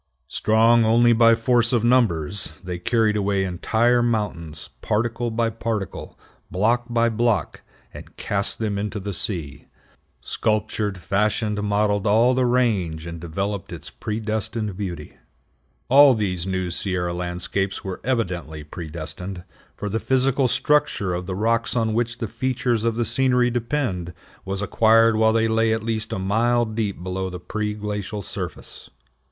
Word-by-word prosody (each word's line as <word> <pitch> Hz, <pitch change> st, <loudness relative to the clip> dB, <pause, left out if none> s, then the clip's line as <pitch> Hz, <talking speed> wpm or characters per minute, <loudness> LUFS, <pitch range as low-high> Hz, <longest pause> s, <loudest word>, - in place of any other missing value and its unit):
Strong 115 Hz, +2 st, +4 dB
only 120 Hz, +2 st, +5 dB
by 115 Hz, 0 st, +6 dB
force 120 Hz, +1 st, +2 dB
of 120 Hz, -3 st, +2 dB
numbers, 100 Hz, -9 st, +1 dB
they 90 Hz, -1 st, -5 dB
carried 110 Hz, +2 st, +1 dB
away 100 Hz, -1 st, +1 dB
entire 110 Hz, +7 st, +1 dB
mountains, 95 Hz, -10 st, -3 dB
particle 120 Hz, +2 st, -1 dB
by 115 Hz, +1 st, 0 dB
particle, 115 Hz, -3 st, -4 dB, 0.3 s
block 115 Hz, +7 st, +1 dB
by 120 Hz, 0 st, +2 dB
block, 115 Hz, -1 st, 0 dB, 0.3 s
and -, -, -12 dB
cast 100 Hz, -1 st, 0 dB
them 105 Hz, -3 st, -2 dB
into 105 Hz, +1 st, -3 dB
the 100 Hz, +1 st, -5 dB
sea; 80 Hz, -, -4 dB, 0.5 s
sculptured, 105 Hz, -2 st, -1 dB
fashioned, 105 Hz, +3 st, 0 dB
modeled 105 Hz, 0 st, +1 dB
all 115 Hz, +5 st, +4 dB
the 130 Hz, -1 st, +2 dB
range, 100 Hz, -11 st, 0 dB
and 85 Hz, -1 st, -7 dB
developed 95 Hz, +4 st, -4 dB
its -, -, -8 dB
predestined 110 Hz, -2 st, -3 dB
beauty. 90 Hz, -6 st, -6 dB, 0.7 s
All 140 Hz, 0 st, +7 dB
these 95 Hz, -4 st, -2 dB
new 95 Hz, -2 st, -2 dB
Sierra 90 Hz, -1 st, -1 dB
landscapes 90 Hz, +2 st, -3 dB
were 95 Hz, -1 st, -6 dB
evidently 90 Hz, -11 st, -2 dB
predestined, 85 Hz, +4 st, -7 dB, 0.3 s
for 105 Hz, -, -4 dB
the 110 Hz, +3 st, -1 dB
physical 130 Hz, +1 st, +2 dB
structure 145 Hz, -10 st, +1 dB
of 90 Hz, +1 st, -4 dB
the 95 Hz, -, -3 dB
rocks 115 Hz, +4 st, 0 dB
on 115 Hz, -2 st, +1 dB
which 115 Hz, +1 st, -1 dB
the 115 Hz, -, -3 dB
features 125 Hz, -1 st, -1 dB
of 115 Hz, -1 st, +1 dB
the 120 Hz, 0 st, 0 dB
scenery 125 Hz, 0 st, +2 dB
depend 115 Hz, -, -2 dB, 0.3 s
was 95 Hz, +1 st, -3 dB
acquired 115 Hz, +2 st, +4 dB
while 110 Hz, 0 st, +4 dB
they 115 Hz, 0 st, +2 dB
lay 110 Hz, 0 st, +2 dB
at 110 Hz, 0 st, -1 dB
least 110 Hz, -1 st, -2 dB
a 110 Hz, -, -2 dB
mile 115 Hz, +5 st, +2 dB
deep 110 Hz, -5 st, -3 dB
below 95 Hz, +1 st, -3 dB
the 90 Hz, 0 st, -7 dB
pre 105 Hz, +4 st, -3 dB
glacial 105 Hz, 0 st, -4 dB
surface. -, -, -7 dB
110 Hz, 145 wpm, -23 LUFS, 95-115 Hz, 0.7 s, All